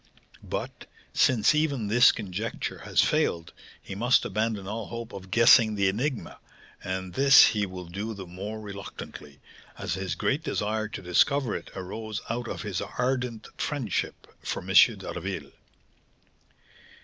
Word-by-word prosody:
But, - - -6 0.3
since 120 +1 +4
even 150 -7 0
this 120 +5 +6
conjecture 105 +1 -4
has - - +3
failed, 85 0 0 0.3
he - - -9
must 120 +6 +3
abandon 110 -3 -2
all 110 +1 -4
hope 115 -1 -7
of 95 -1 -9
guessing 115 0 +6
the 100 -1 +2
enigma; 125 +6 -3 0.4
and 95 -1 -4
this 135 +6 +8
he 105 -2 +1
will 90 -1 -8
do 100 +6 -5
the 95 -1 -8
more 100 +5 -6
reluctantly, 100 -8 -9 0.4
as - - -3
his 95 0 -3
great 140 +4 0
desire 110 -7 -2
to 105 - -8
discover 130 +8 +2
it - - -7
arose 105 +3 -5
out 120 +1 -3
of - - -5
his 100 -4 -3
ardent 125 +1 -2
friendship 130 - -2 0.2
for - - -4
M. - - -2
d'Harville." - - +2
110 Hz, 140 wpm, -27 LUFS, 95-120 Hz, 0.4 s, this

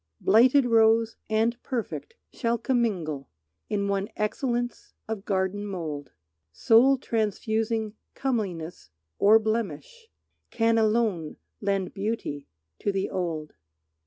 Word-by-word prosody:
Blighted 250 +6 +5
rose 225 -1 +4
and 225 +2 +1
perfect 260 - -4 0.2
shall 235 -1 0
commingle 200 - -1 0.4
In 200 -1 0
one 200 0 -1
excellence 240 +3 -2
of 215 -3 -4
garden 190 +1 -1
mould. 160 -9 -5 0.4
Soul 240 - +5
transfusing 220 -1 -1 0.2
comeliness 185 - -3 0.3
or 210 +2 +7
blemish 220 - -3 0.4
Can 225 0 +2
alone 215 -8 +1 0.2
lend 195 -2 -1
beauty 195 -9 -3 0.3
to 205 - 0
the 195 0 -2
old. 165 -4 -3
215 Hz, 100 wpm, -26 LUFS, 190-230 Hz, 0.4 s, or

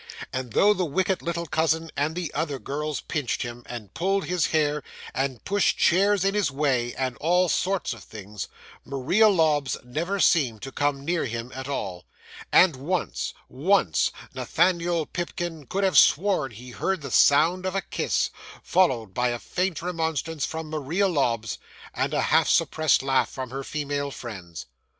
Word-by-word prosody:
And 130 -3 -4
though 210 +1 +5
the 185 - -1
wicked 185 +4 0
little 170 0 -3
cousin 160 +1 0
and 150 +3 -1
the 175 -4 -4
other 150 -4 -2
girls 150 +2 -4
pinched 145 -6 -2
him, 120 0 -7
and 110 -5 -8
pulled 195 +2 0
his 180 -2 +1
hair, 150 -2 +1 0.3
and 130 -3 -2
pushed 200 0 +2
chairs 195 +2 +3
in 195 - +2
his 205 -7 +1
way, 135 -4 0
and 130 -2 -2
all 180 +3 +2
sorts 190 -2 0
of 115 -4 -12
things, 105 -2 -8 0.4
Maria 140 - +3
Lobbs 150 - +2
never 165 +11 -2
seemed 135 - +3
to 135 - -6
come 140 0 -1
near 170 +1 0
him 120 0 -5
at 130 0 -6
all; 95 -10 -4 0.4
and 175 -7 +6
once 140 - -2
once 145 - +2 0.2
Nathaniel 170 -3 +1
Pipkin 175 -4 -5
could 200 +1 -1
have 190 -1 +6
sworn 180 -4 +3
he 125 +4 -10
heard 190 +7 -1
the 140 -3 -6
sound 165 +9 +4
of 185 - -3
a 195 - +1
kiss, - - -1 0.3
followed 125 - +2
by 125 +4 +1
a 120 - -2
faint 180 +5 -2
remonstrance 160 -3 -2
from 160 -1 -6
Maria 155 +6 0
Lobbs, 115 - 0 0.3
and - - -1
a - - +2
half - - +3
suppressed 155 -4 +3
laugh 135 -1 +2
from 130 -2 -6
her 135 +1 -4
female 145 -1 -3
friends. 95 - -8
150 Hz, 165 wpm, -25 LUFS, 130-175 Hz, 0.4 s, and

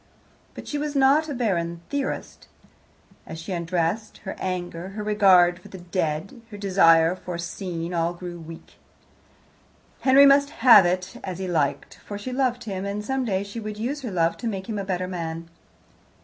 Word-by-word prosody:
But - - -9
she 295 - -3
was 295 0 -3
not 280 +3 +4
a - - -2
bargain 170 -8 -1
theorist. 285 -1 -4 0.8
As 160 - -7
she 165 +4 -7
undressed, 175 +4 -2
her 190 - -4
anger, 180 -1 -4
her 210 - -3
regard 190 -4 +4
for - - -14
the 190 - -10
dead, 175 +3 -3
her 205 - -9
desire 175 -4 +4
for 180 -1 -7
a - - -6
scene, 170 0 -5
all 170 0 0
grew 175 -1 -8
weak. 165 0 -12 1.2
Henry 275 +1 +6
must 280 0 +5 0.2
have 210 -7 +9
it 185 +1 -2
as 185 -2 -5
he 190 0 -4
liked, 145 -5 -1
for 205 - -6
she 250 +5 -6
loved 250 -2 0
him, 195 -3 -4
and 200 +1 -4
some 265 +1 -1
day 195 -3 0
she 200 +3 -7
would 215 -1 -6
use 265 +7 -3
her 250 - -4
love 170 -3 +1
to 235 - -4
make 195 -3 -4
him 215 -2 -3
a - - -3
better 185 -1 -2
man. 165 -2 -5
190 Hz, 185 wpm, -24 LUFS, 170-225 Hz, 1.2 s, have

